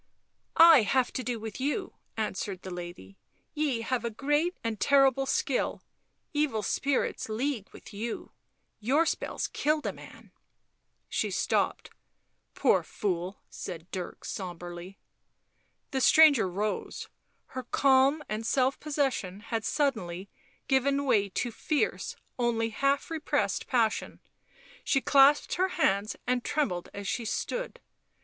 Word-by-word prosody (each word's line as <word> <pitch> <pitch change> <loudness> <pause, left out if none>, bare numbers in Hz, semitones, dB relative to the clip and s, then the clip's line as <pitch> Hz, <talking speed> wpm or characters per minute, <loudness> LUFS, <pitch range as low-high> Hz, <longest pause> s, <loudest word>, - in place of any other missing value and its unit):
" - - -47 0.2
I 265 - +6
have 245 +4 +1
to 255 - -3
do 245 -2 -2
with 220 +2 -7
you," 295 +8 -1 0.2
answered 200 -3 -3
the 190 - -7
lady. 175 - -9 0.2
" - - -43
Ye 295 -6 0
have 245 +1 -1
a 235 - -1
great, 295 - 0
a 230 -1 -1
terrible 270 +2 +3
skill, 265 - 0 0.5
evil 290 -8 0
spirits 275 -2 -1
league 230 -1 -2
with - - -13
you... 220 +3 -5 0.5
your 270 +9 +2
spells - - -2
killed 300 +1 0
a - - -1
man - - -14 0.4
" - - -49 0.3
She - - -1
stopped. - - 0 0.3
" - - -48
Poor - - +3
fool," 185 -1 -3
said 170 -2 -8
Dirk 180 -2 -6
sombrely. 175 0 -7 0.9
The 265 -2 -1
stranger 285 -10 +6
rose; 205 +4 -3 0.5
her 260 - -3
calm 275 +3 +3
and 215 +1 -3
self 260 +3 +1
possession 270 -10 -1
had 225 0 -3
suddenly 200 - -1 0.4
given 275 +1 +2
way 205 -6 +3
to 240 +5 -2
fierce 295 +6 -1 0.2
only 230 -2 +1
half 275 +6 0
repressed 320 -1 -1
passion; 230 -4 0 0.6
she 270 - +2
clasped 280 +2 +5
her 375 +1 +3
hands 200 +2 +1
and 245 0 0
trembled 225 - -1
as 200 0 -7
she 240 - -1
stood. - - -3
240 Hz, 135 wpm, -29 LUFS, 200-280 Hz, 0.9 s, I